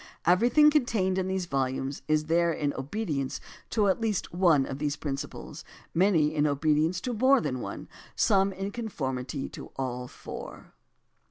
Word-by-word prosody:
Everything 240 - +5
con 300 -3 +4
tained 190 -6 0
in 185 - -1
these 190 -1 -1
volimies 135 -2 -2
is 155 0 +2
there 170 +1 +2
in 150 -3 -1
obedience 140 -2 -3 0.3
to 215 - +1
one 200 - +4
at 210 - -3
least 215 -4 0
of 155 -7 +2
these 145 -1 -1
principles, 140 -3 -6 0.3
many 165 -4 +3
in 150 -1 +2
obedience 155 +4 +1
to 250 - -2
more 260 +4 +4
than 130 - -2
one, - - -6 0.3
some 195 -2 +3
in 195 +1 -4
conformity 135 - -4
to - - -9
all 125 -2 -3
four. - - -9
165 Hz, 160 wpm, -28 LUFS, 140-200 Hz, 0.3 s, Everything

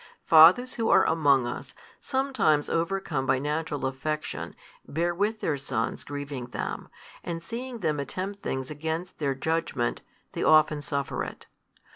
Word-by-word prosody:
Fathers 175 +11 +7
who 225 -1 -1
are - - +6
among 140 -6 +3
us, 120 - -6 0.2
sometimes 260 - +1
overcome 165 -5 -1
by 135 - +3
natural 150 0 -2
affection, 150 +4 -3 0.3
bear 170 +3 0
with 210 +5 -1
their 150 - 0
sons 125 -4 -2
grieving 145 -3 -5
them, 125 - -5 0.3
and 165 -1 -4
seeing 240 +2 -6
them 155 -4 0
attempt 190 +8 -4
things 130 +1 -3
against 160 +4 -4
their 140 -3 0
judgment, 145 -4 -1 0.3
they - - -5
often 155 -1 +5
suffer 140 -1 -2
it. - - -8
155 Hz, 140 wpm, -27 LUFS, 140-175 Hz, 0.3 s, Fathers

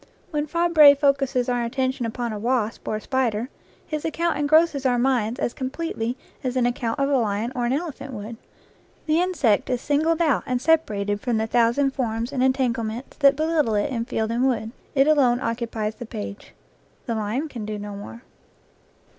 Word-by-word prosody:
When 300 -1 -1
Fabre 320 -3 +6
focuses 275 -3 +1
our 245 -1 0
attention 260 +1 -1
upon 235 0 -3
a 210 - -5
wasp 230 -1 -1
or - - -1
a 215 - -4
spider, 245 -2 -1 0.4
his 305 -2 -4
account 335 +1 0
engrosses 295 -1 +3
our 250 -2 +2
minds 240 -3 +1
as 240 - -1
com 260 -1 -3
pletely 255 -6 -3 0.3
as 255 -1 -2
an 250 -2 +2
account 240 0 -1
of 275 - +2
a 285 - +2
lion 220 0 -1
or 240 -1 0
an 245 - +1
elephant 275 -3 -4
would; 225 0 -7 0.7
the 315 +1 +2
insect 285 - +1
is 250 -1 0
singled 310 +5 +1
out 310 -6 +2
and 250 -1 0
separated 210 -10 +1
from 245 -3 0
the 220 - 0
thousand 240 +4 +2
forms 235 -2 -2
and 260 - -1
entanglements 245 -2 -1
that 280 -1 +5
belittle 310 -7 +1
it 205 +7 0
in 230 -2 -2
field 220 -1 -2
and 245 +3 +2
wood; 225 -3 -1 0.2
it 270 0 +5
alone 265 -6 +4
occupies 230 -3 -2
the 240 +1 -9
page. 205 -3 -8 0.5
The 235 - -2
lion 220 +7 -2
can 240 -7 -7
do 210 0 -4
no 205 0 -6
more. 220 +4 -9
250 Hz, 190 wpm, -24 LUFS, 225-280 Hz, 0.7 s, Fabre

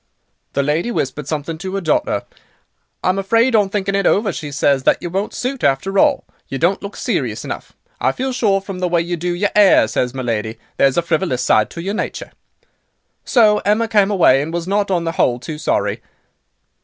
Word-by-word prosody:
"The 140 - +1
lady 155 +9 0
whispered 140 - -3
something 155 +1 -4
to 190 +1 -5
'er - - 0
daughter. 155 -4 0 0.8
'I - - +2
am 185 +1 +1
afraid, 230 +5 +2
on 205 -3 +3
thinking 195 -1 -2
it 200 0 +2
over,' 200 -2 +2
she 150 -2 -6
says, 140 -1 +2
'that - - +3
you 175 - -6
won't 195 +3 -2
suit, 255 +1 -4
after 145 +9 +1
all. - - +3 0.2
You 135 - -4
don't 175 +7 +1
look 200 0 -7
serious - - -2
enough. - - -7 0.3
I - - +2
feel 260 +1 -3
sure, 205 -6 +1
from 195 -2 -7
the 180 - 0
way 170 -1 +2
you 175 +1 -3
do 175 +1 -2
your 200 +3 0
'air,' 200 - +6
says 125 +3 -2
my 130 - -3
lady, 110 -2 -2 0.2
'there's 135 -1 +3
a 175 - +2
frivolous 160 -5 -1
side 110 - +3
to 170 - -7
your 195 +2 -2
nature.' 215 - -4 0.9
"So 215 -4 +4
Emma 215 +3 +1
came 210 -3 +3
away, 165 -9 +4
and 155 +3 -4
was 170 0 -3
not, 200 +1 0
on 175 -3 0
the 165 - -1
whole, 125 -6 +1
too 150 +4 -7
sorry." - - -1
180 Hz, 210 wpm, -18 LUFS, 150-200 Hz, 0.9 s, air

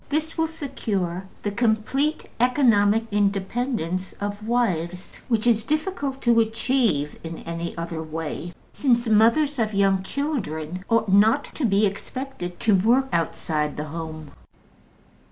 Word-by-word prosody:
This 310 +2 -1
will 325 -1 +1
secure 205 - -3 0.2
the 205 - -1
complete 235 +7 0
economic 225 -4 +4
independence 200 -2 -1
of 205 +1 -4
wives, 180 -7 -1
which 230 -3 +1
is 225 -2 +3
difficult 300 - -2
to 235 -1 +5
achieve 225 - +1
in 165 0 -6
any 170 0 -5
other 165 -1 -4
way, 160 +2 -5 0.2
since 240 -3 +2
mothers 230 +7 +4
of 215 -2 0
young 195 -1 +3
children 190 - -3
ought 225 -4 +2
not 220 +8 +5
to 295 - -1
be 205 -1 +3
expected 200 -2 -5
to 220 - +3
work 240 +8 +3
outside 155 -2 -1
the 150 0 -4
home. 155 -2 -6
215 Hz, 130 wpm, -24 LUFS, 175-250 Hz, 0.2 s, to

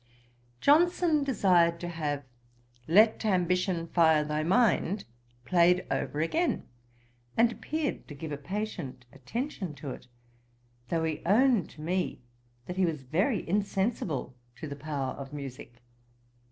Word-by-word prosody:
Johnson 325 0 +4
desired 180 -10 +3
to 175 - -3
have 150 -4 -3 0.6
'Let 215 +7 +5
ambition 180 -3 +1
fire 160 -2 +4
thy 150 0 -1
mind,' 195 +1 +2 0.4
played 180 +2 +4
over 150 - -1
again, 325 - 0 0.7
and 230 +1 +5
appeared 310 +5 -3
to 145 - -9
give 155 +2 -6
a 145 - -3
patient 145 -7 -5
attention 190 - -4
to 140 -2 -6
it; - - -10 0.8
though 165 -1 0
he 160 -2 -2
owned 225 - +3
to 150 - -13
me 180 -3 -2 0.4
that 180 - -6
he 190 - +3
was 155 -5 -3
very 185 - 0
insensible 195 - -1 0.2
to 155 - -7
the 140 - -6
power 140 -3 -3
of 135 0 -9
musick. 125 -4 -8
170 Hz, 130 wpm, -29 LUFS, 150-210 Hz, 0.8 s, Let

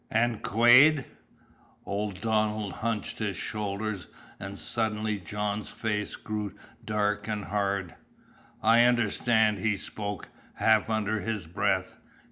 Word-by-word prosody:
"And 115 0 +1
Quade?" 125 +6 +6 0.8
Old 100 -2 -3
Donald 110 -2 0
hunched 110 -2 -2
his 105 -3 -2
shoulders, 105 -2 -3 0.3
and 100 +1 -6
suddenly 110 -2 -1
John's 105 +3 -3
face 105 -2 -2
grew 105 -2 -5 0.3
dark 105 -1 -1
and 105 -2 -3
hard. 100 -3 -1 0.7
"I 115 +2 +6
understand," 110 -2 +2
he 105 +1 +1
spoke, 100 -1 -5 0.3
half 110 -1 +3
under 110 -1 0
his 105 -2 -3
breath. 95 +2 -1
105 Hz, 110 wpm, -28 LUFS, 100-110 Hz, 0.8 s, Quade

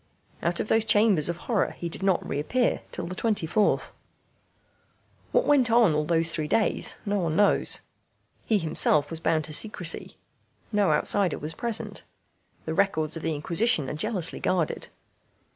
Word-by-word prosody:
Out 170 +1 -1
of - - -2
those 225 0 +3
chambers 210 -7 +3
of 170 - -3
horror 225 -5 0
he 170 - -5
did 170 - -5
not 190 -2 0
reappear 230 - -1
till - - -5
the 175 - -6
24th. 210 -1 0 1.4
What - - +2
went 270 -5 +3
on 230 -7 +4
all 150 0 0
those 165 0 +1
three 155 -2 -3
days 220 - 0
no 205 0 -1
one 165 -3 -1
knows. 205 +2 +3 0.7
He 220 - +3
himself 155 -3 +3
was 165 - -4
bound 160 -1 0
to 155 - -6
secrecy. 180 -2 0 0.5
No 205 -3 +2
outsider 200 -5 +1
was 155 +2 -6
present. 230 +6 -3 0.6
The 160 - -3
records 160 -5 0
of 165 - -6
the 160 -1 -2
Inquisition 170 - +1
are - - -5
jealously 180 +1 0
guarded. 175 -4 -1
175 Hz, 160 wpm, -26 LUFS, 160-215 Hz, 1.4 s, on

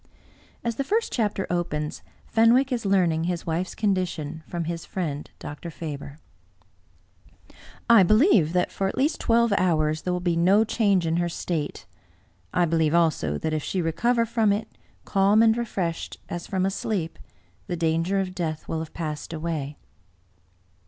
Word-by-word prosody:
As 235 -1 -2
the 275 - 0
first 440 +11 0
chapter 210 -5 0
opens, 150 -3 -2 0.2
Fenwick 240 +4 +4
is 235 -5 -1
learning 170 -4 +2
his 175 -1 -2
wife's 170 +3 -2
con 210 -2 +2
dition 160 -4 -3
from 170 -1 -3
his 165 0 -4
friend, 150 -6 -4
Dr. 150 +4 -7
Faber. 145 -3 -7 0.8
*' - - -24
J 230 -3 +8
BELIEVE 215 - +4
that 180 0 +1
for 195 - -1
at - - -4
least 290 +5 +1
twelve 235 -1 +3
hours 155 -3 +1
there 180 - -2
will 180 - 0
be 175 -1 0
no 190 +6 +4
change 205 -5 +2
in 165 +1 +1
her 175 0 0
state. 165 -3 -3 0.7
I 175 - +2
believe 160 -1 +2
also 155 - +2
that 155 - -2
if 155 - 0
she 190 - -2
re 165 -2 0
cover 235 +6 +2
from 225 -2 +2
it, 215 +2 -3 0.3
calm 200 +3 +4
and 225 -1 +5
refreshed, 190 -8 -3
as 175 0 -5
from 190 -1 0
a 195 - +1
sleep, 190 -5 -3 0.5
the 175 -2 -3
danger 165 +4 +1
of 185 -1 -2
death 160 -4 -4
will 160 - -2
have 160 -1 -7
passed 155 -2 -4
away." 155 -3 -3
175 Hz, 170 wpm, -25 LUFS, 160-210 Hz, 0.8 s, J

